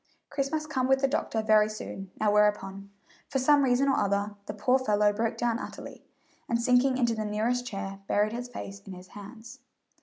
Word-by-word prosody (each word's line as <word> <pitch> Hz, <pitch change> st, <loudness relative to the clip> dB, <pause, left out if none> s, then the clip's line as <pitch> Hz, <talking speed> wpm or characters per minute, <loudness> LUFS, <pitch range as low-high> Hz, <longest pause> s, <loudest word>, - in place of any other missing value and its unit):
Chris 275 Hz, -1 st, -1 dB
must 310 Hz, -1 st, -2 dB
come 260 Hz, -4 st, 0 dB
with 265 Hz, 0 st, +4 dB
the 275 Hz, -, +3 dB
doctor 245 Hz, -6 st, -1 dB
very 215 Hz, -1 st, +4 dB
soon 195 Hz, -2 st, -7 dB
now 215 Hz, -1 st, +2 dB
whereupon, 200 Hz, -1 st, +1 dB, 0.4 s
for 270 Hz, -, -1 dB
some 285 Hz, +2 st, +4 dB
reason 265 Hz, +1 st, +2 dB
or 270 Hz, -, +2 dB
other, 200 Hz, +1 st, 0 dB
the -, -, -3 dB
poor 250 Hz, +6 st, +2 dB
fellow 210 Hz, -4 st, +2 dB
broke 225 Hz, +2 st, -1 dB
down 235 Hz, -1 st, 0 dB
utterly, -, -, -9 dB, 0.5 s
and 235 Hz, -, +1 dB
sinking 250 Hz, +2 st, +3 dB
into 240 Hz, -2 st, +2 dB
the 220 Hz, -1 st, -3 dB
nearest 230 Hz, +4 st, -1 dB
chair, 195 Hz, -3 st, -5 dB
buried 210 Hz, +1 st, +1 dB
his 245 Hz, +1 st, -4 dB
face 200 Hz, -5 st, -8 dB
in 195 Hz, -, -7 dB
his 180 Hz, +1 st, -12 dB
hands. 220 Hz, +3 st, -11 dB
225 Hz, 195 wpm, -28 LUFS, 205-255 Hz, 0.5 s, with